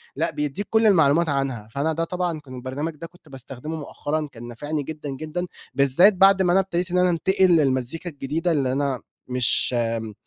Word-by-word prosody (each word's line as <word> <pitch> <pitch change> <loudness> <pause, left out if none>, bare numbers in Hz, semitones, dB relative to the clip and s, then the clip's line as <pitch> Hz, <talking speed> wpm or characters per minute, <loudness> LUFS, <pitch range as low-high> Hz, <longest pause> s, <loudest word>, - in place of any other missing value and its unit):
لأ، - - -1
بيدّيك 150 +7 -3
كل 220 0 +4
المعلومات 165 -3 +4
عنها، 135 -6 -2
فأنا 150 +5 -1
ده 165 - -1
طبعًا 175 -1 -2
كان 130 -4 -11
البرنامج 135 +6 -4
ده 165 +3 -8
كنت 175 -3 -22
باستخدمه 135 +3 -7
مؤخرًا 150 0 -3
كان 120 0 -10
نافعني 145 +5 -4
جدًا، 150 -1 -7
جدًا 155 +6 -4 0.3
بالذّات 140 +10 +5
بعد 195 +1 +5
ما 180 -2 +3
أنا 190 - +5
ابتديت 180 -1 -3
إن 180 - +1
أنا 180 0 +4
انتقل 190 +3 +2
للمزّيكا 135 +4 -1
الجديدة 155 +4 -2
اللي 135 -5 +1
أنا 135 -1 -1 0.3
مش 125 0 +2 0.2
م 110 -1 -7
150 Hz, 185 wpm, -23 LUFS, 135-175 Hz, 0.3 s, بالذّات